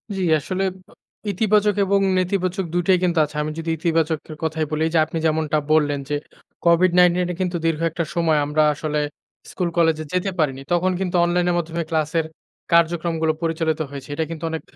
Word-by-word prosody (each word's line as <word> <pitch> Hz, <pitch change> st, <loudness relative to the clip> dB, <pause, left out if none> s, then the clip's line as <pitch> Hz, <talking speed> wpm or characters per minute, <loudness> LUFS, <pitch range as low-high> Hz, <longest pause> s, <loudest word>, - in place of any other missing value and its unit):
জ্বি, 190 Hz, -, -2 dB, 0.2 s
আসলে 185 Hz, +6 st, -3 dB, 0.3 s
অ -, -, -18 dB, 0.4 s
ইতিবাচক 210 Hz, +1 st, +2 dB
এবং 200 Hz, +1 st, +2 dB, 0.2 s
নেতিবাচক 185 Hz, 0 st, 0 dB
২ 175 Hz, -, +1 dB
টোই 185 Hz, -, +5 dB
কিন্তু 175 Hz, -2 st, +2 dB
আছে। 150 Hz, -, -13 dB
আমি 155 Hz, -, -3 dB
যদি 165 Hz, -, -4 dB
ইতিবাচক 165 Hz, -1 st, +1 dB, 0.3 s
কথাই 160 Hz, 0 st, -1 dB
বলি 155 Hz, 0 st, -1 dB
এইযে 165 Hz, 0 st, +2 dB
আপনি 165 Hz, -, -5 dB
যেমনটা 155 Hz, -1 st, +1 dB
বললেন 145 Hz, -2 st, +3 dB
যে 145 Hz, -, 0 dB, 0.5 s
COVID-19 175 Hz, +1 st, +5 dB, 0.2 s
এর 175 Hz, -, -6 dB
কিন্তু 180 Hz, -1 st, -1 dB
দীর্ঘ 165 Hz, -1 st, 0 dB
একটা 165 Hz, +1 st, -2 dB
সময় 160 Hz, -3 st, +2 dB
আমরা 150 Hz, +1 st, +2 dB
আসলে 150 Hz, 0 st, -2 dB, 0.5 s
স্কুল 180 Hz, -2 st, -1 dB
কলেজে 160 Hz, -2 st, +2 dB
যেতে 180 Hz, +2 st, 0 dB
পারিনি। 135 Hz, -4 st, 0 dB
তখন 180 Hz, +2 st, +2 dB
কিন্তু 185 Hz, -1 st, -2 dB
অনলাইনের 175 Hz, 0 st, +1 dB
মাধ্যমে 170 Hz, 0 st, -2 dB
ক্লাসের 160 Hz, 0 st, 0 dB, 0.5 s
কার্যক্রমগুলো 165 Hz, -1 st, +2 dB
পরিচালিত 160 Hz, -1 st, -1 dB
হয়েছে। 140 Hz, -1 st, -9 dB
এটা 160 Hz, -, 0 dB
কিন্তু 165 Hz, 0 st, -7 dB
অনেক 160 Hz, -, -3 dB
165 Hz, 175 wpm, -22 LUFS, 155-180 Hz, 0.5 s, টোই